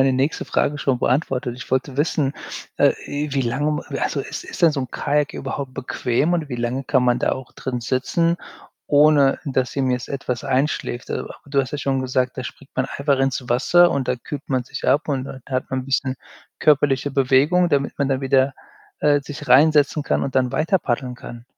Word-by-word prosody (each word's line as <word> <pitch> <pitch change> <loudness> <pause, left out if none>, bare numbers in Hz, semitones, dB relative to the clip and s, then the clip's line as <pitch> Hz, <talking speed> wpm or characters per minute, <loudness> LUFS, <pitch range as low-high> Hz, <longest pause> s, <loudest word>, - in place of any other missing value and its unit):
meine 135 0 +4
nächste 135 +4 0
Frage 145 0 0
schon 135 -3 0
beantwortet. 130 -2 0
Ich 125 -1 -10
wollte 130 +1 -1
wissen, 145 -2 +1 0.5
äh, - - +5
i 145 +1 -3
wie 135 - +2
lange 135 +5 0
m 150 - -1 0.2
also - - -1
ist - - -6
ist - - -9
denn 165 - +6
so 145 - -2
'n 130 -3 -5
Kajak 150 0 0
überhaupt 135 -2 -5
bequem 130 +4 0
und 165 -4 -1
wie 125 - -4
lange 120 +3 -2
kann 135 -2 +2
man 125 -1 +3
da - - +1
auch 130 -2 -7
drin 125 -2 -4
sitzen, 165 +8 0 0.5
ohne, 145 -2 +5
dass 130 -3 -1
ihm 130 -2 +1
jetzt 125 0 -2
etwas 130 -3 -3
einschläft? 130 -2 -1
So, - - -3 0.2
du 140 -1 +1
hast 130 -1 -5
ja 150 - -2
schon 135 -2 0
gesagt, 130 0 -1
da - - -2
springt - - -10
man - - 0
einfach 140 -1 0
ins 135 -1 0
Wasser 175 +8 +5
und 135 -2 -1
da 125 - +1
kühlt 145 +4 -8
man 130 -2 0
sich - - -6
ab 150 - +2
und 135 -3 -1
dann 130 -1 -9
hat 130 -1 -3
man 130 0 -1
'n 130 - -8
bisschen 130 0 -1 0.4
körperliche 145 -2 +3
Bewegung, 140 +7 +3
damit 140 -3 +1
man 140 -2 +1
dann 135 0 0
wieder, 135 0 +2 0.5
äh, 145 -1 +3
sich 145 0 -8
rein 140 +5 +6
setzen 150 0 +2
kann - - 0
und 135 - -3
dann 125 -1 +2
weiter 160 +7 +2
paddeln 125 -3 -2
kann. 120 -1 -10
135 Hz, 215 wpm, -22 LUFS, 130-145 Hz, 0.5 s, denn